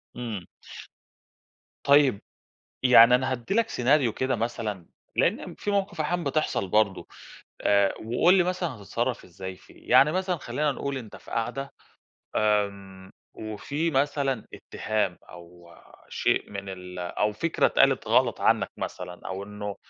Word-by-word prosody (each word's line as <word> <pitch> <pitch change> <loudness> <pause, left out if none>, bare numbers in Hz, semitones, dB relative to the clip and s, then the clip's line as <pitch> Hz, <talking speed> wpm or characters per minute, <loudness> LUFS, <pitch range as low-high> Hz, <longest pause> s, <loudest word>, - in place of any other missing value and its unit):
إمم. 115 -7 -5 1.4
طيب، 140 -6 +5 0.6
يعني 125 -1 +8
أنا 130 +1 -1
هادّي 125 +6 -3
لك 230 +1 +2
سيناريو 125 -1 +2
كده 130 +2 0
مثلًا، 110 -5 -3 0.3
لأن - - 0
في 205 - -3
موقِف 195 -5 -1
أحيانًا 175 +3 -1
بتحصل 140 -9 -1
برضه 100 0 +1 0.6
آآ، 100 -1 +3
وقُل 125 +11 +4
لي 190 - +5
مثلًا 180 -1 -1
هتتصرف 115 +3 -3
إزاي 95 +1 -8
فيه، - - -17
يعني 150 +3 +6
مثلًا 185 0 0
خلينا 150 -1 -1
نقول 140 0 -4
أنت 115 -5 -10
في - - -15
قعدة، 125 +4 -3 0.7
آمم، 100 -3 -1 0.2
وفي 140 +10 -3
مثلًا 135 -3 0
اتهام 105 -5 -2
أو 85 0 -14 0.4
شيء - - 0
من 100 -1 -6
ال 90 -1 -8
أو 90 +4 -1
فكرة 165 +10 +1
اتقالت - - +3
غلط - - +2
عنك - - +2
مثلًا 90 0 -6
أو 95 +1 -4
إنه 105 0 -6
115 Hz, 135 wpm, -26 LUFS, 100-140 Hz, 1.4 s, يعني